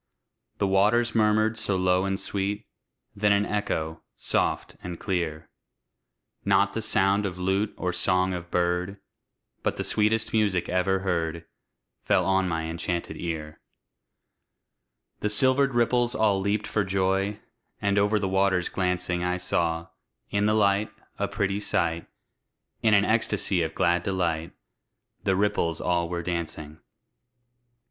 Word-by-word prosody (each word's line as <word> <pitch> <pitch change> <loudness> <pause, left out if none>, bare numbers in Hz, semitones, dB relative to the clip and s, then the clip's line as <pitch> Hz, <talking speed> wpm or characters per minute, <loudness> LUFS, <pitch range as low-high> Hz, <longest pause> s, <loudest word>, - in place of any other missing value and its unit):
The 100 - +1
waters 105 +5 +3
murmured 110 0 +2
so 100 -3 -1
low 90 0 +2
and 95 0 -1
sweet, 100 +2 -3 0.5
Then 105 0 +2
an 100 0 +3
echo, 80 -7 -2 0.2
soft - - -1
and 90 -2 -6
clear, 80 -4 -2 1.0
Not - - +3
the - - -2
sound 100 +2 +2
of 95 -3 -3
lute 95 +3 0
or 90 -1 -2
song 90 +2 +1
of 85 -1 -6
bird, 90 +3 0 0.6
But - - -1
the - - -2
sweetest 110 +1 +1
music 105 -5 +1
ever 95 +1 +1
heard, 85 -3 -2 0.6
Fell - - +2
on 95 -1 +2
my 80 -1 -1
enchanted 85 +1 -3
ear. 80 -3 -5 1.6
The 105 - -1
silvered 130 +4 +3
ripples 120 +1 +2
all 105 -5 +2
leaped 100 +1 0
for 105 - 0
joy! 95 +2 0 0.4
And 100 -1 +2
over 105 +1 +3
the 100 -2 -1
waters 95 -2 +1
glancing 90 -1 -1
I 90 0 0
saw, 85 -2 -1 0.4
in 100 +1 +2
the 105 - +3
light, 100 0 +2 0.3
a - - +1
pretty 100 -1 -1
sight; 85 -5 -1 0.7
In 110 -2 +4
an 100 0 +4
ecstasy 105 -4 +1
of 80 -1 -2
glad 85 -1 +2
delight, 85 -3 -1 0.7
The 95 - +3
ripples 95 -5 0
all 85 -1 0
were 85 -1 -3
dancing. 80 -3 -4
95 Hz, 140 wpm, -26 LUFS, 85-105 Hz, 1.6 s, In